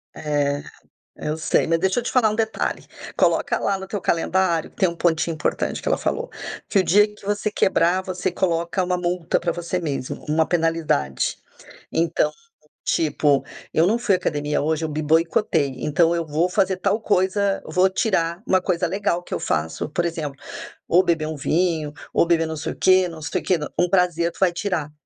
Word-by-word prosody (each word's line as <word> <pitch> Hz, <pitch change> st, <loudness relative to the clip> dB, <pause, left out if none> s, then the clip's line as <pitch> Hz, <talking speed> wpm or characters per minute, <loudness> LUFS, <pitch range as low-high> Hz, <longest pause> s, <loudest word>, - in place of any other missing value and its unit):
É. 145 Hz, -1 st, -1 dB, 0.6 s
É, -, -, -4 dB
eu 155 Hz, -, -1 dB
sei, 160 Hz, -, +1 dB
mas 165 Hz, 0 st, +2 dB
deixa 190 Hz, +6 st, +1 dB
eu -, -, -9 dB
te -, -, -2 dB
falar 235 Hz, -4 st, +3 dB
um -, -, -2 dB
detalhe: 220 Hz, 0 st, -2 dB, 0.3 s
coloca -, -, +2 dB
lá 195 Hz, -1 st, 0 dB
no 190 Hz, -, -7 dB
teu 200 Hz, +1 st, -4 dB
calendário 170 Hz, -1 st, +1 dB
que -, -, -30 dB
tem 190 Hz, -3 st, +3 dB
um 170 Hz, -, -5 dB
pontinho 165 Hz, -1 st, +1 dB
importante 150 Hz, -, -2 dB
que -, -, -2 dB
ela -, -, +2 dB
falou, 480 Hz, +1 st, -2 dB, 0.4 s
que 200 Hz, -, +3 dB
o -, -, +5 dB
dia 205 Hz, +4 st, +5 dB
que 210 Hz, -, -17 dB
você 205 Hz, +1 st, 0 dB
quebrar 185 Hz, -2 st, +2 dB
você 185 Hz, 0 st, -2 dB
coloca 170 Hz, 0 st, 0 dB
uma 180 Hz, 0 st, 0 dB
multa 175 Hz, -1 st, 0 dB
pra 170 Hz, -, -1 dB
você 175 Hz, +1 st, -3 dB
mesmo, 140 Hz, -6 st, -4 dB
uma 155 Hz, +1 st, +2 dB
penalidade. 165 Hz, -, 0 dB, 0.6 s
Então, 165 Hz, 0 st, +1 dB, 0.6 s
tipo, 155 Hz, -, +2 dB, 0.3 s
eu 160 Hz, -, +4 dB
não 230 Hz, +4 st, +2 dB
fui 205 Hz, -5 st, +2 dB
à -, -, +1 dB
academia 150 Hz, -4 st, -1 dB
hoje, 160 Hz, +2 st, 0 dB
eu -, -, -3 dB
me 155 Hz, +1 st, -3 dB
boicotei, 160 Hz, -1 st, +2 dB
então 165 Hz, +3 st, +2 dB
eu 170 Hz, -1 st, -1 dB
vou 160 Hz, +4 st, 0 dB
fazer 190 Hz, 0 st, +1 dB
tal 205 Hz, +4 st, 0 dB
coisa, 195 Hz, 0 st, +1 dB
vou 185 Hz, +1 st, +3 dB
tirar 180 Hz, -4 st, 0 dB
uma 185 Hz, -1 st, +3 dB
coisa 180 Hz, -1 st, 0 dB
legal 190 Hz, -1 st, -1 dB
que -, -, -8 dB
eu -, -, -1 dB
faço 80 Hz, -, -2 dB
por 170 Hz, +4 st, -1 dB
exemplo, 155 Hz, -5 st, -4 dB, 0.5 s
ou 180 Hz, +2 st, +5 dB
beber 165 Hz, -3 st, +1 dB
um 155 Hz, -, -4 dB
vinho, 160 Hz, -1 st, 0 dB, 0.2 s
ou -, -, +4 dB
beber 165 Hz, -1 st, +3 dB
não 160 Hz, 0 st, -5 dB
sei -, -, -4 dB
o -, -, -16 dB
quê, 185 Hz, -1 st, +4 dB
não 165 Hz, -2 st, -9 dB
sei 150 Hz, -, -2 dB
o -, -, -15 dB
quê, 185 Hz, -, +2 dB, 0.2 s
um 175 Hz, -, +3 dB
prazer 175 Hz, -2 st, +2 dB
tu -, -, -16 dB
vai 185 Hz, -2 st, +4 dB
tirar 170 Hz, -5 st, -2 dB
170 Hz, 205 wpm, -22 LUFS, 160-190 Hz, 0.6 s, o